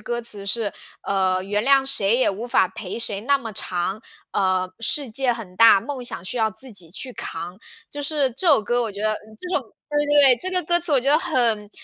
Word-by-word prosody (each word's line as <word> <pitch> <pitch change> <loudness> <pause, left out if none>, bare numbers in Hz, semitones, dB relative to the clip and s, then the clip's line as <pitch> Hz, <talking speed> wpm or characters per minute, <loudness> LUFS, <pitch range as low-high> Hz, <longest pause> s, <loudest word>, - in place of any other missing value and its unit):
歌 240 0 -3
词 210 -4 -3
是， 205 +1 -1 0.3
呃， 185 -1 0
“原 205 +2 -1
谅 270 0 +4
谁 220 -5 +1
也 255 - +3
无 205 +4 -4
法 235 -5 +3
陪 195 +3 -6
谁 210 -4 -2
那 280 +3 +2
么 230 -5 -7
长”， 190 +2 -3 0.3
呃， 185 -2 +1
“世 270 +4 +1
界 255 +2 +1
很 220 -6 -9
大， 225 -2 +7
梦 265 +1 -6
想 185 -7 -6
需 245 - -4
要 220 -1 +1
自 255 +4 -8
己 175 -5 -6
去 250 +7 -6
扛”。 170 -1 -6 0.3
就 290 - -6
是 285 -2 +1
这 340 +9 0
首 285 -7 +6
歌， 240 +3 +1
我 225 - -3
觉 200 0 -9
得， 215 0 +1
嗯， 215 0 -10
这 360 - -8
种 275 - -1 0.3
对 295 0 +1
对 - - -6
对， 285 -4 +6
这 370 - -2
个 365 -1 +1
歌 345 +2 +2
词 345 - +3
我 275 - +4
觉 265 - -1
得 295 - +5
很 230 - 0
230 Hz, 255 characters per minute, -22 LUFS, 200-275 Hz, 0.3 s, 大